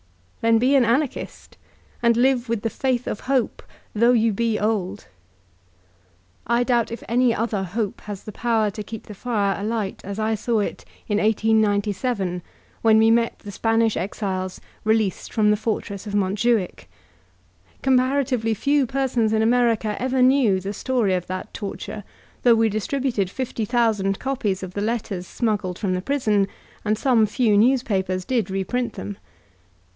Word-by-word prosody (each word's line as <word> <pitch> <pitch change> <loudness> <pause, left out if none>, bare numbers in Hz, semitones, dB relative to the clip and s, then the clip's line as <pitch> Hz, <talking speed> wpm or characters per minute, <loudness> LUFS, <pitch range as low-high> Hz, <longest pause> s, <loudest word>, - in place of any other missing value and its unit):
Then 230 0 +4
be 255 +4 +3
an 265 - +5
Anarchist, 250 +4 -2 0.5
and 235 -1 +3
live 250 -1 +2
with 230 -3 -1
the 225 - -1
faith 255 -2 -1
of - - -3
hope, 260 -3 -1 0.3
though 235 +3 +4
you 225 -2 +3
be 225 +1 0
old. 205 -2 -1 1.4
I 235 +1 +2
doubt 240 -2 +1
if 230 - -6
any 240 0 +3
other 220 -3 -1
hope 200 +2 -3
has 205 -2 -7
the 215 - -7
power 225 -1 +1
to 210 - -6
keep 220 +1 -8
the 210 - -9
fire 205 -2 0
alight 215 -3 -2
as 200 +1 -6
I 220 0 0
saw 220 +1 0
it - - -4 0.2
in 210 -1 +1
1897, 210 -2 +1 0.4
when 220 -1 +5
we 225 +1 +5
met 230 0 +2
the 205 - -9
Spanish 225 +1 +1
exiles 185 -1 -3 0.2
released 220 -3 0
from 210 -1 +3
the - - +4
fortress 210 -2 -3
of 205 - -3
Montjuich. 205 +1 0 1.0
Cooh 270 - +2
paratively 255 -4 +1
few 280 +1 +2
persons 250 -4 0
in 220 0 +2
America 230 -2 +2
ever 255 0 +2
knew 255 -7 +4
the 195 +2 -5
story 230 -3 0
of 180 -1 -2
that 185 +3 -5
torture, 205 0 -6 0.4
though 240 -2 +6
we 225 0 +3
distributed 215 -1 -1
fifty 235 -1 -3
thousand 215 -4 +1
copies 215 -8 -2
of 185 -1 -7
the 205 - -3
letters 205 -5 -2
smuggled 205 -6 -1
from 195 -4 -1
the 180 - -1
prison, 215 -6 +1 0.4
and 215 0 +1
some 235 -3 +3
few 215 0 +2
newspapers 205 -6 +2
did 235 -7 0
reprint 220 +5 -2
them. 205 -1 -7
220 Hz, 160 wpm, -23 LUFS, 205-240 Hz, 1.4 s, though